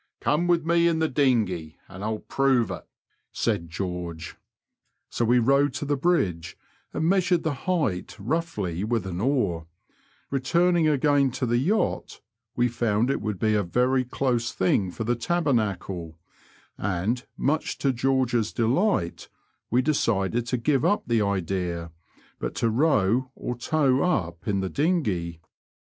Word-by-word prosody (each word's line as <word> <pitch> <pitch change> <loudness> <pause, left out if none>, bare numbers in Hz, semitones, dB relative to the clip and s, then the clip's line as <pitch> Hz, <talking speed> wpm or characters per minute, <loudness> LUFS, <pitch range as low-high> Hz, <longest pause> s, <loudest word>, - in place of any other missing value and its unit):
Come 170 +4 +1
with 170 -2 +2
me 170 0 +3
in 165 -1 +2
the 160 0 +1
dinghey, 110 - 0
and 95 +1 -9
I'll 110 0 -1
prove 130 -3 +1
it," - - -7 0.4
said 85 -1 -1
George, 85 -1 -5 0.8
So - - -1
we 120 +2 +4
rowed 135 +3 +3
to 145 - -3
the 145 0 +1
bridge 95 - 0 0.3
and 160 - -2
measured 180 -2 +2
the 160 - 0
height 145 - -2
roughly 105 - -2
with 110 -2 -1
an 90 -1 -4
oar; 100 - 0 0.6
returning 170 +5 +2
again 145 -1 +3
to 130 - -2
the 120 0 +1
yacht, 205 - -1 0.4
we 120 0 +3
found 120 0 +1
it - - -2
would 105 -3 -3
be 110 +3 +1
a 105 - +3
very 125 +8 +1
close 125 -1 -1
thing 95 0 +1
for 100 - -5
the 120 +2 +1
tabernacle, 105 - -1 0.6
and, 100 +6 -1
much 155 +3 0
o 135 - +5
George's 125 -3 +1
delight, 120 - 0 0.4
we 125 +3 +2
decided 115 -5 0
to 125 - 0
give 135 +2 +1
up 205 - +2
the 115 -2 +1
idea, 90 -4 -2 0.5
but - - -4
to 115 - +1
row 125 -2 +2
or 125 - -4
tow 135 +1 +1
up 85 - -1
in 100 -2 +1
the 95 - -2
dinghey. 105 - 0
120 Hz, 150 wpm, -25 LUFS, 95-145 Hz, 0.8 s, o